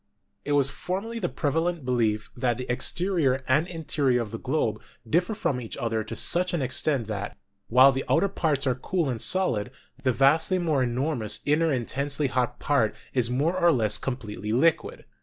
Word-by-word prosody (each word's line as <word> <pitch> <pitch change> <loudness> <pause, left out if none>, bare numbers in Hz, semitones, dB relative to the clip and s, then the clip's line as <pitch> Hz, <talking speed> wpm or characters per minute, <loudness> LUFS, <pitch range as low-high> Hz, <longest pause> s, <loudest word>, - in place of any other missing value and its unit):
It 145 - -1
was 140 -1 +3
formerly 205 +10 -4
the 175 -5 -1
prevalent 165 +1 -1
belief 115 -4 0
that 120 -2 0
the 125 - -5
exterior 145 -1 0
and 150 +6 +2
interior 145 -7 0
of 105 - -10
the 115 - -5
globe 125 -6 -1 0.3
differ 180 - +1
from 130 -11 -1
each 115 - -7
other 115 -2 -1
to - - -6
such 180 +1 +1
an 165 - -1
extent 130 0 +1
that, 100 -1 -5 0.3
while 130 +3 +6
the 135 0 -3
outer 190 +5 +3
parts 155 -7 -1
are 130 - +2
cool 155 +5 -2
and 115 -3 -4
solid, 125 - +1 0.3
the 130 -2 +2
vastly 145 - +3
more 160 -6 +1
enormous 125 -3 -1
inner 155 +2 +2
intensely 140 +3 -1
hot 125 -2 -1
part 140 -7 +1 0.2
is 125 -3 +1
more 145 +8 0
or 175 -2 +4
less 110 -6 +2
completely 110 -5 -5
liquid. 160 +8 +1
135 Hz, 175 wpm, -26 LUFS, 120-165 Hz, 0.3 s, while